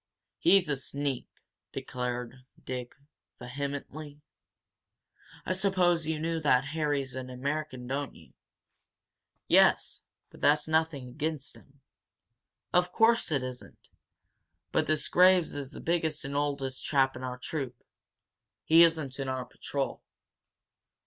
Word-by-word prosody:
"He's 195 -3 +5
a 145 - +1
sneak!" 140 -1 -2 0.4
declared 125 0 -4 0.2
Dick, 125 -1 -5 0.4
vehemently. 140 +3 -6 1.3
"I 185 - 0
suppose 180 -4 +2
you 160 -1 0
know 165 +1 -1
that 135 -4 +3
Harry's 145 -4 -1
an 130 0 -6
American, 135 0 -3
don't 140 +2 -3
you?" - - -17 1.1
"Yes, - - +4 0.3
but - - -15
that's 150 +1 +4
nothing 160 -4 0
against 150 +2 -4
him." 140 0 -20 0.9
"Of 180 0 +3
course 230 -3 +3
it 140 -4 +1
isn't! 125 -1 -9 0.8
But - - +1
this 155 -1 +1
Graves 180 -1 +5
is 140 -2 -5
the - - -10
biggest 160 -3 -1
and 140 +1 -4
oldest 140 -2 -1
chap 135 -3 +2
in 125 - -7
our 125 0 -4
troop 130 -2 -4 0.9
he 165 +1 +6
isn't 155 -5 +3
in 135 -1 -2
our 130 -1 -2
patrol. 140 -1 -4
145 Hz, 120 wpm, -29 LUFS, 130-160 Hz, 1.3 s, he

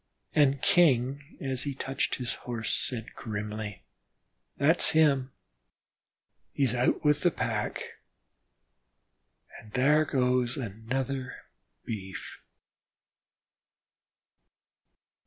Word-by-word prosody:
And 140 -2 +3
King 140 -3 +3
as 130 -2 -2
he 140 -2 -2
touched 135 +1 -1
his 125 -2 -2
Horse 115 -3 -3
said 115 -3 -1
grimly: 105 - -5 0.7
"That's 160 +5 +5
him, 135 -4 +3 1.2
he 140 - 0
is 125 -3 +3
out 125 +4 +1
with 150 0 +3
the 175 - +4
pack, - - -2 1.8
an' 110 - -15
thar 150 +7 +3
goes 125 -2 +1
another 130 +3 -3 0.5
Beef." 95 -4 -7
130 Hz, 85 wpm, -29 LUFS, 115-140 Hz, 1.8 s, That's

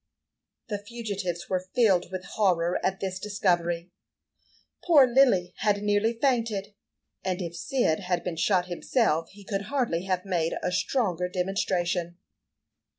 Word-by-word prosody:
The 205 -2 -2
fugitives 205 -6 -4
were 185 0 -2
filled 195 -9 +3
with 185 0 -5
horror 180 -4 +1
at 190 0 -1
this 190 -1 -3
discovery. 175 -4 0 0.9
Poor 305 -6 +7
Lily 240 -8 +3
had 205 -1 +1
nearly 205 +2 +2
fainted, 230 -5 0 0.5
and 185 -1 -1
if 170 -2 -5
Cyd 205 -4 0
had 180 -3 -1
been 180 -2 -3
shot 180 +1 +2
himself, 175 - 0
he 205 +1 -15
could 200 0 -3
hardly 235 -11 0
have 185 0 -1
made 170 -4 0
a - - 0
stronger 180 -3 0
demonstration. 180 -2 -1
190 Hz, 135 wpm, -27 LUFS, 175-210 Hz, 0.9 s, Poor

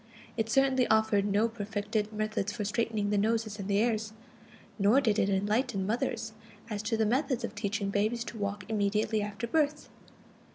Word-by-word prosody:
It 225 -1 -1
certainly 265 +1 +3
offered 220 -2 +3
no 205 +2 +2
perfected 210 -1 -3
methods 215 -1 -2
for 210 0 -4
straightening 215 -1 -1
the 205 - +2
noses 220 0 0
and 195 - -4
the 200 -1 +2
ears, 220 -1 0 0.7
nor 205 +7 +5
did 220 -6 +2
it 195 - +2
enlighten 205 +2 0
mothers 225 0 -2 0.4
as 205 -1 -2
to 220 +1 0
methods 255 +2 0
of 235 - -3
teaching 205 -1 -2
babies 215 +4 0
to 235 - -8
walk 200 -1 -3
immediately 215 0 +1
after 205 +3 -4
birth. 300 +3 0
215 Hz, 165 wpm, -30 LUFS, 205-230 Hz, 0.7 s, nor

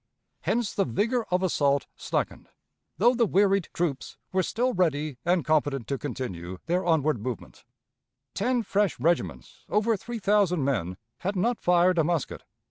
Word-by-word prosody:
Hence 235 -3 -1
the 200 - +2
vigor 225 - 0
of 180 +1 +1
assault 140 -6 +2
slackened, - - -3 0.5
though 240 +5 +5
the 235 -2 +2
wearied 195 -1 +2
troops 160 -6 -3
were 185 - +2
still 245 +7 0
ready 155 -6 0
and 175 -4 +2
competent 145 -5 +1
to 140 -2 -1
continue 95 - -5
their 180 +2 0
onward 155 - +2
movement. 120 -1 -6 0.7
Ten 245 +3 0
fresh 205 - 0
regiments, 95 - -1
over 215 +2 +2
three 235 +4 -6
thousand 195 -6 +2
men, 95 -10 -1 0.2
had 195 +3 -2
not 230 +6 0
fired 180 0 +4
a - - +4
musket. 165 -2 -1
175 Hz, 150 wpm, -27 LUFS, 140-205 Hz, 0.7 s, though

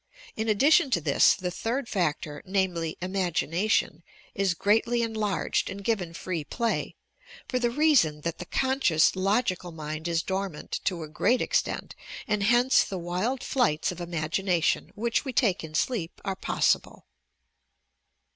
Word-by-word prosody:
In 220 +1 -2
addition 280 - +4
to 210 - +2
this 145 -3 +4
the 180 -2 -4
third 235 +7 -2
factor 150 -6 -2
namely 180 -4 -1
"imagination" 185 +1 0 0.3
is 195 -3 0
greatly 225 +6 +2
enlarged 215 -3 -1
and 200 +1 -7
given 190 -7 -1
free 170 -2 -3
play, 230 +9 -2 0.5
for 255 - -1
the 240 -1 +1
reason 235 - +3
that 170 +1 -4
the 180 - -6
conscious, 260 - +2
logical 185 -2 0
mind 155 0 -5
is 165 -1 0
dormant, 190 -4 -3
to 175 -4 -1
a - - -7
great 240 +11 +1
extent, - - -1 0.3
and 210 -1 0
hence 240 +5 +4
the 190 - -5
wild 185 +9 -2
flights 200 - +1
of 180 - -8
imagination, 170 +1 0
which 235 +2 0
we 270 - -4
take 205 -9 +2
in 155 -1 -8
sleep, 180 -3 -1
are 195 -1 -1
possible. - - 0
190 Hz, 145 wpm, -27 LUFS, 170-230 Hz, 0.5 s, addition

